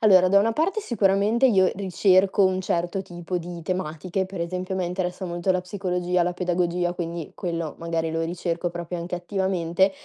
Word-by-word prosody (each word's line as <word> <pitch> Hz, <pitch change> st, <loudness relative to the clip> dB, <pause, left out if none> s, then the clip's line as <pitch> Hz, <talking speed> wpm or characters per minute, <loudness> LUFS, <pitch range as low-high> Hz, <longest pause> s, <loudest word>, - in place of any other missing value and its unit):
allora, 185 Hz, -4 st, +6 dB
da 200 Hz, +1 st, +6 dB
una 225 Hz, +3 st, +2 dB
parte 360 Hz, -, 0 dB
sicuramente 215 Hz, -, +3 dB
io 190 Hz, -6 st, +4 dB
ricerco 190 Hz, +1 st, +3 dB
un 185 Hz, 0 st, +2 dB
certo 175 Hz, +1 st, -1 dB
tipo 175 Hz, -1 st, -4 dB
di 170 Hz, 0 st, -7 dB
tematiche, 185 Hz, +1 st, -2 dB
per 190 Hz, -3 st, -4 dB
esempio 185 Hz, +2 st, -3 dB
a -, -, -2 dB
me 185 Hz, -, 0 dB
interessa 180 Hz, +1 st, -3 dB
molto 175 Hz, +1 st, -1 dB
la 180 Hz, 0 st, 0 dB
psicologia, 180 Hz, -2 st, -1 dB
la 175 Hz, +1 st, -1 dB
pedagogia, 175 Hz, -1 st, 0 dB
quindi 170 Hz, -2 st, -5 dB
quello 170 Hz, -4 st, -3 dB
magari 165 Hz, -1 st, -2 dB
lo 165 Hz, 0 st, -1 dB
ricerco 170 Hz, +1 st, -2 dB
proprio 175 Hz, 0 st, -5 dB
anche 170 Hz, +1 st, -4 dB
attivamente. 190 Hz, 0 st, +1 dB
180 Hz, 180 wpm, -25 LUFS, 175-190 Hz, -, allora